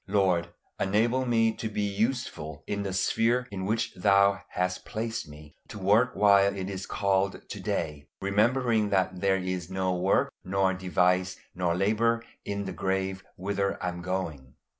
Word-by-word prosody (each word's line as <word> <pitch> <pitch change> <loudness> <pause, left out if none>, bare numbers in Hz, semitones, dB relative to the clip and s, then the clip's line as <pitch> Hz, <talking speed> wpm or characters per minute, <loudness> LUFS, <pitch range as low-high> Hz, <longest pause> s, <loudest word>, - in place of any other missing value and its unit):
Lord, 95 -4 +2 0.3
enable 115 +6 +1
me 115 -2 +3
to 110 - -3
be 105 -1 -2
useful 100 - -2
in 100 0 -2
the 100 -1 -3
sphere 115 +6 +1
in 95 -1 -4
which 115 +2 0
Thou 100 +1 +4
hast 90 0 -2
placed 110 -5 -4
me, 75 0 -13
to - - -9
work 105 +6 +3
while 100 -1 +5
it 95 +1 -3
is 95 -1 -5
called 100 -1 0
to - - -7
day, 75 -3 -3
remembering 110 +2 +2
that 95 -2 0
there 95 -1 +3
is 90 -2 -3
no 95 -1 0
work 90 +2 +2
nor 95 0 +1
device 90 0 +1 0.2
nor 90 -2 0
labor 115 +5 +2 0.2
in 100 0 -3
the - - -4
grave 95 0 -2
whither 100 +1 -1
I 90 - -1
am 90 0 -6
going. 85 -8 -4
95 Hz, 160 wpm, -28 LUFS, 90-105 Hz, 0.3 s, while